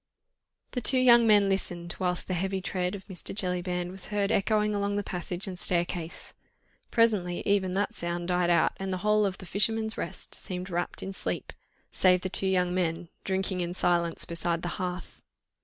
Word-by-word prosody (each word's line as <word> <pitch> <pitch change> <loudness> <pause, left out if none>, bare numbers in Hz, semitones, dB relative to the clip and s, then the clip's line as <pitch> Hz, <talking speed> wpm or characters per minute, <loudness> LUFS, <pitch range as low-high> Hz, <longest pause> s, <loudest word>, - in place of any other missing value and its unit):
The 250 - -2
two 260 - +4
young 240 -2 +7
men 205 -2 +6
listened, 175 -3 -2
whilst 180 -1 -1
the 185 - -1
heavy 190 +2 -1
tread 185 0 -2
of 195 - -9
Mr. 190 -1 -5
Jellyband 180 -2 -1
was 190 0 -4
heard 205 -1 0
echoing 210 +1 +2
along 200 0 0
the 205 - 0
passage 180 0 -4
and 185 -3 -6
staircase. 175 -1 0 0.6
Presently 205 -7 +2
even 190 -2 +2
that 200 +1 0
sound 170 +1 -3
died 180 -1 +2
out, 170 -2 +4
and 195 0 -3
the 185 +2 -3
whole 210 -1 +4
of 190 - -4
"The - - -10
Fisherman's 220 +3 0
Rest" - - -5
seemed 185 0 -5
wrapt 175 0 -2
in 195 - -5
sleep, - - -4 0.4
save 180 -1 +4
the 185 - -2
two 195 - -1
young 180 -1 +2
men 170 -1 -1
drinking 190 -1 -1
in 175 0 -3
silence 170 -2 +1
beside 170 0 -2
the 175 - -1
hearth. 180 -1 -5
185 Hz, 185 wpm, -28 LUFS, 175-200 Hz, 0.6 s, young